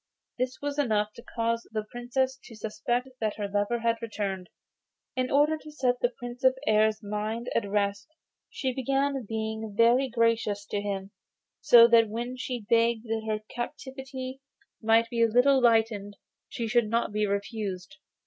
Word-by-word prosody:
This 255 +1 -1
was 290 0 -2
enough 215 -5 +1
to - - -11
cause 230 0 -2
the 215 -1 -2
Princess 260 +2 -1
to 230 - -11
suspect 240 +4 -2
that 215 -2 -1
her 205 -1 -3
lover 205 +4 0
had 230 0 0
returned. 200 -5 -4 0.7
In 255 0 0
order 300 +3 +3
to 305 - -11
set 250 -4 0
the 245 - +2
Prince 245 0 -9
of 260 0 +5
the 265 +2 -13
Air's 215 +1 +3
mind 215 +3 -3
at 205 -3 0
rest 200 0 0 0.4
she 260 -2 -2
began 275 +2 0
by 270 - -2
being 220 -1 -4
very 240 +3 +4
gracious 230 -3 +1
to 205 - -1
him, 195 -1 -4 0.5
so 235 -1 +8
that 230 -2 +5
when 240 +3 -4
she 250 -3 -5
begged 230 -1 +3
that 220 0 -2
her 215 -1 -1
captivity 265 +1 -6 0.4
might 225 +1 +4
be 235 -1 0
a 230 - +6
little 255 +4 +4
lightened 220 -4 +2 0.3
she 230 - -3
should 230 -1 +2
not 230 -1 0
be 210 0 0
refused. 200 -2 -4
230 Hz, 170 wpm, -28 LUFS, 215-250 Hz, 0.7 s, so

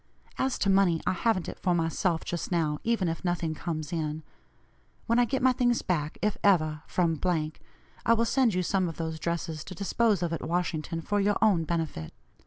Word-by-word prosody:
As 265 -1 +1
to 200 - +1
money, 190 -4 +4
I - - +2
haven't 185 -2 0
it - - -7
for 180 -1 +1
myself 165 +1 0
just 175 +1 -4
now, 155 -4 +1
even 230 -5 +1
if 165 +2 -3
nothing 175 -3 -1
comes 155 -1 -4
in. 155 -1 -2 0.8
When 230 +1 +2
I 245 - +5
get 260 +1 -2
my 260 - +6
things 245 -1 +1
back, 155 -4 -1
if 210 -1 0
ever, 155 -6 +3
from, 165 -4 0 0.8
I 230 - +4
will 230 +1 +2
send 245 -4 +2
you 180 - +1
some 185 0 +1
of 165 - -8
those 160 -1 -3
dresses 165 -2 -3
to 185 - -9
dispose 200 +1 +1
of 170 -1 -1
at 165 - -3
Washington 165 -1 -2
for 205 +5 0
your 205 0 +2
own 190 -7 +3
benefit. 160 - -3
175 Hz, 195 wpm, -28 LUFS, 160-205 Hz, 0.8 s, my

